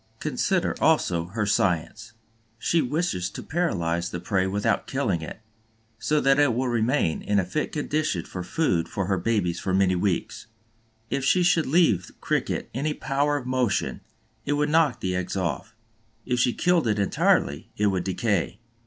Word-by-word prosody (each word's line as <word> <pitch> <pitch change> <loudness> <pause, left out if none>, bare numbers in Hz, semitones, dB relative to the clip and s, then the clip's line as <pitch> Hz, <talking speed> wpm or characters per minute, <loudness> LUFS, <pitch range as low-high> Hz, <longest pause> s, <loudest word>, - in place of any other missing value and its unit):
Consider, 180 +4 0
also, 90 - +2
her 105 +4 -2
science. 100 +4 0 0.4
She 165 +8 +1
wishes 145 - -1
to - - -8
paralyze 85 - -1
the 85 - -5
prey 95 +1 0
without 100 +2 0
killing 85 - -1
it, 80 - -8 0.6
so 150 0 +1
that 135 0 +3
it 145 -6 +3
will 130 +1 0
remain 115 - +1
in 105 - 0
a 95 - +2
fit 150 +12 -2
condition 150 - -1
for 90 - -6
food 90 - 0
for 95 - -2
her 95 0 0
babies 90 -4 0
for 95 -1 -1
many 95 -1 +3
weeks. 90 +2 -2 0.6
If 140 - -1
she 180 +6 +3
should 170 -2 +3
leave 130 - +3
the - - -15
Cricket - - -2
any 150 +4 -1
power 145 +2 0
of 135 - -6
motion, 125 -5 0 0.4
it 145 - -1
would 150 0 +1
knock 155 -5 +2
the 90 -1 -1
eggs 90 +2 -3
off; 95 +4 -3 0.5
if 125 -1 0
she 125 - +3
killed 175 -1 +2
it 105 -1 +1
entirely, 95 -7 +1
it 105 - +1
would 95 -3 +1
decay. 100 -1 -1
110 Hz, 170 wpm, -25 LUFS, 90-145 Hz, 0.6 s, that